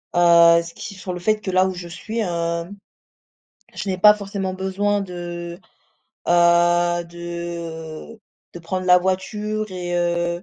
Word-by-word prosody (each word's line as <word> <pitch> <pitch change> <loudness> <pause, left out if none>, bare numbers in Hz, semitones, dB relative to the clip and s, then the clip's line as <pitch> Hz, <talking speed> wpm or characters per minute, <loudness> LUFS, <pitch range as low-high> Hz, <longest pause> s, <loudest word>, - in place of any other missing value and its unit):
Heu, 170 -1 +6
ce 170 0 -10
qui 200 - -8
font 185 0 -6
le 180 - -5
fait 215 +4 +1
que 190 - -3
là 185 +1 +3
où 190 - -3
je 175 -1 -7
suis, 220 +6 -6
hem, 170 -1 -2 1.0
je 200 - -5
n'ai 185 - -1
pas 210 +3 +8
forcément 195 -2 -4
besoin 195 +2 -1
de, 175 -2 -7 0.7
heu, 175 0 +3
de 170 +2 -7 0.4
de - - -6
prendre 185 +2 -4
la 180 - +7
voiture 210 +3 -2
et 180 -1 -4
heu, 175 0 -1
175 Hz, 150 wpm, -21 LUFS, 170-190 Hz, 1.0 s, pas